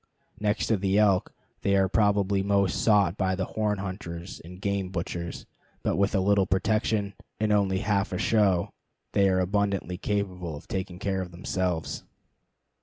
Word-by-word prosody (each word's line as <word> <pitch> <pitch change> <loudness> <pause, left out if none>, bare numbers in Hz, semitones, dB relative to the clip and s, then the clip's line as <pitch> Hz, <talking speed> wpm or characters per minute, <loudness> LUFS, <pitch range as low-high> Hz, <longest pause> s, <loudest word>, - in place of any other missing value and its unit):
Next 105 +1 0
to 110 - +2
the 95 +1 +1
elk, 100 -3 +3 0.3
they 100 - +2
are 95 -1 +4
probably 100 -1 +2
most 100 -2 +1
sought 100 -4 +4
by 95 -1 +1
the 95 0 -1
horn 105 0 -1
hunters 95 -2 -6
and 90 +2 -11
game 100 -1 -1
butchers; 85 -1 -4 0.4
but - - +1
with 100 +2 +1
a - - +3
little 100 0 +3
protection, 105 +1 +1 0.3
and 110 0 +1
only 95 -2 +2
half 100 -2 0
a 90 - -2
show, 95 -4 +2 0.4
they 100 -1 +4
are 95 0 +2
abundantly 95 -1 0
capable 90 -5 -2
of 75 - -11
taking 95 -2 -4
care 95 0 -1
of 90 - -5
themselves. 90 -1 -2
95 Hz, 165 wpm, -27 LUFS, 90-100 Hz, 0.4 s, are